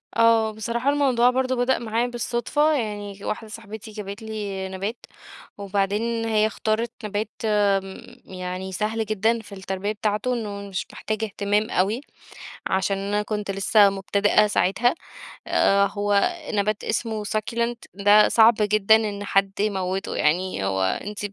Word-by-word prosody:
آه 230 -1 +4
بصراحة 235 +4 -2
الموضوع 265 -4 +3
برضه 260 0 0
بدأ 245 +1 +1
معايا 230 +1 -1
بالصدفة، 245 +5 0
يعني 205 -6 -3
واحدة 220 +1 -4
صاحبتي 220 0 -9
جابت 205 0 -7
لي 205 -3 -4
نَبات، 195 +5 -5 0.5
وبعدين 205 +4 -1
هي 215 -1 +2
اختارت 220 +1 -1
نَبات 210 +1 -3
آمم 200 -3 +1 0.2
يعني 185 0 -6
سهل 220 +3 -1
جدًا 215 +2 +1
في 205 -2 -11
التربية 190 +1 -3
بتاعته، 215 +3 -1
إنه 205 -4 -5
مش 185 -2 -4
محتاج 215 0 -3
اهتمام 205 0 0
أوي، 205 +7 +1 0.7
عشان 190 +1 0
أنا 200 +1 -1
كنت 210 -1 -3
لسه 200 +1 +4
مبتدئة 200 +2 +2
ساعتها، 210 - +2 0.5
آآ 200 0 +3
هو 205 - +1 0.2
نبات 210 0 0
اسمه 220 -2 -2
succulent 230 +3 -1 0.2
ده 205 +2 +5
صعب 230 +1 +6
جدًا 210 0 +4
إن 205 -2 -2
حد 195 0 +1
يموته، 195 -2 -1
يعني 170 - 0
هو 95 0 0
أنتِ 205 - -2
210 Hz, 140 wpm, -24 LUFS, 200-225 Hz, 0.7 s, صعب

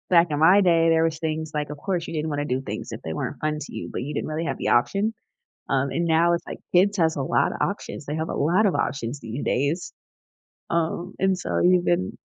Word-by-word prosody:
Back 175 -1 +6
in 145 - 0
my 180 +6 +6
day, 165 -3 +4
there 165 0 +4
was 160 -1 0
things 160 -1 -3
like, 150 -1 -2
of 150 - -6
course, 175 +1 -2
you - - -6
didn't 155 0 -2
wanna 145 -1 -2
do 130 -2 -1
things 135 - -6
if - - -6
they 80 - -5
weren't 110 - -4
fun 155 0 -1
to - - -8
you, - - -5
but - - -4
you 145 +4 -4
didn't - - -2
really 155 +2 -3
have - - -2
the - - -1
option, 195 - +2 0.6
um, 135 0 +1
and 170 - -1
now, 170 +1 +3
it's 170 - -4
like, - - -7 0.2
kids 200 +3 +4
has 160 -2 +2
a 140 - -1
lot - - +1
of - - -6
options; 145 - -3
they 150 - -3
have 160 +1 -2
a - - -3
lot 175 +9 +3
of 190 - +2
options 135 0 -2
these 115 +3 -5
days. 145 +7 -1 0.8
Um, 170 +2 -1
and, 190 -1 +2
so, 180 - -1
even 180 0 +2
160 Hz, 250 wpm, -24 LUFS, 145-175 Hz, 0.8 s, Back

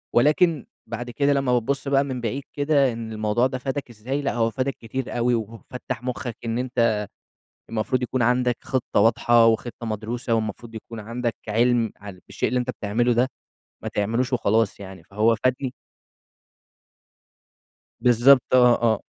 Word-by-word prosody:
ولكن 150 +4 +3 0.2
بعد 120 +2 -5
كده 140 +3 +1
لمّا 135 -2 +1
بابص 135 +4 0
بقى 140 0 +3
من 130 -3 -4
بعيد 130 +4 -3
كده، 145 -2 +2
إن 115 -1 -6
الموضوع 110 +3 +1
ده 130 0 -4
فَادك 135 0 -4
إزاي، 125 +6 -4
لأ 140 - -1
هو 115 -1 +1
فَادك 130 +3 -2
كتير 120 +2 -5
أوي، 120 0 +2
وفتّح 120 +3 -6
مُخك 125 -2 -4
إن 115 +1 -1
أنت 115 -4 +1 0.7
المفروض 115 +3 -1
يكُون 125 +1 -1
عندك 125 0 +2
خطة 130 -5 -1
واضحة، 115 +1 +4
وخطة 115 +1 0
مدروسة، 115 +2 -3
والمفروض 115 +1 -3
يكُون 110 +1 -8
عندك 115 +2 -3
عِلم 115 0 +2
ع 105 0 -10
بالشيء 90 +3 -4
اللي 125 +1 +1
أنت 125 - -3
بتعمله 120 +1 0
ده، 125 +3 +2 0.6
ما - - -3
تعملوش 115 +5 -1
وخلاص 110 -3 +1
يعني، 95 -3 -10
فهو 110 +4 +2
فادني 130 0 0 2.3
بالضبط. 125 +2 +6
آه، 130 - +7 0.2
آه. 110 -3 +2
120 Hz, 155 wpm, -24 LUFS, 115-130 Hz, 2.3 s, آه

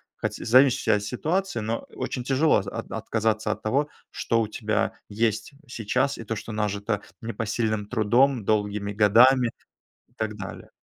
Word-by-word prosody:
Хотя - - -4
зависящая 130 0 +5
от 105 - -5
ситуации, 155 - -1
но 110 +2 -2
очень 125 - -4
тяжело 140 +4 +3
з - - -12
от - - -6
отказаться 110 -1 -1
от - - -4
того, 140 +7 0 0.2
что 115 - 0
у 110 - 0
тебя 110 0 -1 0.2
есть 110 +3 -1 0.2
сейчас, 125 +3 -1
и 115 - -7
то, 115 0 -3
что 110 - -7
нажито 105 0 -1 0.2
непосильным 110 -2 -2
трудом, 120 +2 +2
долгими 105 -1 0
годами 120 +5 +5 0.6
и - - -33
так 110 -1 -2
далее. 100 -2 -8
110 Hz, 155 wpm, -25 LUFS, 105-125 Hz, 0.6 s, зависящая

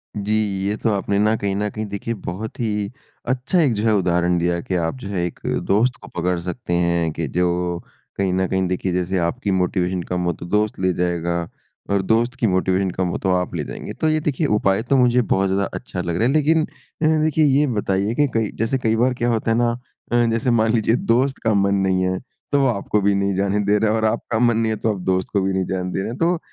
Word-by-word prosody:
जी। 105 +1 -1 0.3
ये 105 - 0
तो 115 - +3
आपने 100 0 0
ना 110 +1 +3
कहीं 100 -2 -2
न 105 +1 -1
कहीं 110 +1 -5
देखिए 100 +3 -4
बहुत 105 +6 -5
ही 105 -3 -1 0.4
अच्छा 130 +8 +1
एक 140 -7 +3
जो 105 0 -2
है 110 - +4
उदाहरण 90 -2 +2
दिया 85 0 0
कि 90 - -3
आप 85 +2 -1
जो 125 - -8
है 90 -3 -1
एक 90 - -6
अ, - - 0
दोस्त 120 +6 +2
को - - -11
पकड़ 90 +1 0
सकते 90 +2 -4
हैं 85 -1 +1
कि 80 0 -3
जो 90 +2 0 0.4
कहीं 95 -2 +1
न 95 0 +1
कहीं 95 0 0
देखिए 90 +1 -1
जैसे 90 +1 0
आपकी 100 +6 -1
मोटिवेशन 90 -1 0
कम 90 +1 -2
हो 85 - +1
तो 80 - -9
दोस्त 105 +3 0
ले 95 -1 +1
जाएगा 85 -1 -1 0.4
और 100 -1 +2
दोस्त 115 +5 +1
की 115 - +2
मोटिवेशन 95 0 +1
कम 90 +1 -1
हो 85 - -2
तो 95 - +1
आप 90 -1 -1
ले 80 - -2
जाएँगे। - - -7
तो 160 - 0
ये 155 0 +2
देखिए 150 0 0
उपाय 95 0 +2
तो 140 - +1
मुझे 125 -1 +4
बहुत 95 -4 +1
ज़्यादा 100 +1 +1
अच्छा 95 -7 -5
लग 85 -1 -2
रहा 115 - +2
है 135 - +1
लेकिन 155 +1 +3 0.4
अ, - - +2
ह 155 0 +4
देखिए 155 0 +3
ये 145 +1 +3
बताइए 105 -2 0
कि 145 +2 +3
कई 115 -2 +1
जैसे 115 +4 0
कई 115 -3 +1
बार 125 +3 +2
क्या 120 -1 -1
होता 115 -1 0
है 115 - +2
ना 120 0 +2 0.4
अ, 120 0 +4
जैसे 115 +2 0
मान 110 -1 +3
लीजिए 115 0 +2
दोस्त 130 +3 +1
का 110 - +2
मन 100 0 +2
नहीं 95 0 +1
है 95 0 0 0.3
तो 145 - +3
वो 135 - +3
आपको 105 -2 0
भी 100 +1 +3
नहीं 100 0 +1
जाने 100 +2 +1
दे 105 +1 +3
रहा 110 +1 +2
है 110 - +1
और 110 - 0
आपका 110 +1 -1
मन 120 -2 +3
नहीं 115 -1 +1
है - - 0
तो 110 -2 +2
आप 100 - -6
दोस्त 95 0 0
को 100 - +2
भी 95 0 0
नहीं 95 -1 0
जाने 90 -1 -2
दे - - -1
रहे 95 - -3
हैं। 120 - -6
तो 170 +1 +1
100 Hz, 260 wpm, -21 LUFS, 90-115 Hz, 0.4 s, है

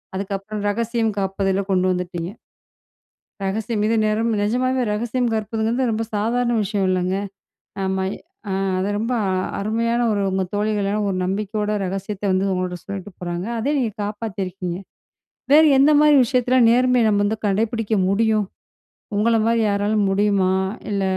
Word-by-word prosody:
அதுக்கப்புறம் 200 +2 -4
ரகசியம் 230 +1 0
காப்பதில 195 0 0
கொண்டு 185 -1 +2
வந்துட்டீங்க. 180 0 -3 1.1
ரகசியம் 210 +2 -1
இது 225 - +2
நேம் 220 +2 +1
நிஜமாவே 255 +4 +1
ரகசியம் 240 +2 -1
காற்பதுங்கிறது 225 +3 -1
ரொம்ப 225 +1 -1
சாதாரண 235 +3 +1
விஷயம் 200 -1 -1
இல்லங்க. 185 +1 0 0.7
ஆமா, 190 0 -1 0.5
அ - - 0 0.3
அத 190 - -1
ரொம்ப 230 +3 -1 0.5
அருமையா 230 +3 0 0.2
ஒரு 200 -1 0
உங்க 190 0 0
தோழிகளான 210 0 0
ஒரு 185 - -2
நம்பிக்கையோட 210 +2 -2
ரகசியத்த 195 +2 -5
வந்து 195 +1 +1
உங்கள்ட 180 -1 -2
சொல்லிட்டு 200 0 -7
போறாங்க. 175 +2 -4
அதே 280 +7 0
நீங்க 230 -4 0
காப்பாத்தியிருக்கீங்க. 195 -4 -4 0.8
வேறு 310 +2 +8
எந்த 300 +2 +6
மாரி 300 -1 +6
விஷயத்துல 250 +1 +2
நேர்மைய 250 0 +3
நம்ம 205 -1 +2
வந்து 220 +1 -1
கடைபிடிக்க 225 +2 0 0.2
முடியும்? 215 0 +2 0.7
உங்கள 225 +3 +2
மாரி 230 0 +2
யாரால 205 +1 0 0.2
முடியுமா? 195 -1 +2 0.4
இல்ல 200 -1 -1
210 Hz, 135 wpm, -21 LUFS, 195-230 Hz, 1.1 s, வேறு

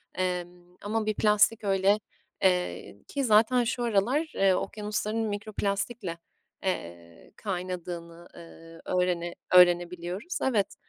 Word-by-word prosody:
Emm, 180 -1 -4
ama 215 +1 -1
bir 215 - +1
plastik 210 +1 +3
öyle, 195 +1 +3 0.4
eee, 180 -1 0
ki 280 -1 -2
zaten 230 +2 +4
şu 240 +1 -2
aralar, 240 +9 +1
eee, 195 -1 +4
okyanusların 215 +3 -2
mikroplastikle, 205 -2 -3 0.5
eee, 85 - -5
kaynadığını, 175 -3 -5
eee, 165 -1 -13
öğrene 180 -1 0 0.2
öğrenebiliyoruz, 180 - +3
evet. 220 -7 +1
190 Hz, 105 wpm, -28 LUFS, 175-215 Hz, 0.5 s, zaten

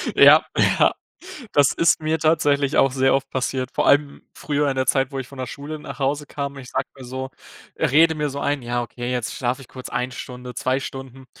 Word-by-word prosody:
Ja, - - +8
ja. - - +4 0.6
Das 140 -1 +4
ist 165 - +3
mir 155 +1 0
tatsächlich 145 -3 +2
auch 135 - +4
sehr 135 0 +3
oft 135 0 0
passiert. 130 0 -2
Vor - - 0
allem 145 0 +3
früher 145 -1 -1
in 135 - -2
der 130 0 0
Zeit, 135 0 +2
wo 135 - -4
ich 130 - -6
von 140 - -13
der 130 -1 -4
Schule 145 +5 -7
nach 150 - -9
Hause 145 +2 -1
kam, 140 0 -5
ich 130 -2 -10
sage - - -1
mal 135 - -11
so, 130 +1 -5 0.5
rede 160 +4 +4
mir 150 -1 -1
so 140 +1 -5
ein: 145 -1 -1
„Ja 120 0 -2
okay, 120 +1 -5
jetzt 125 -3 -2
schlafe 125 +1 -2
ich 130 - -13
kurz 130 -1 -9
1 125 +1 -2
Stunde, 125 0 -8
2 130 +2 0
Stunden.“ 135 -1 -8
135 Hz, 220 wpm, -22 LUFS, 130-145 Hz, 0.6 s, Ja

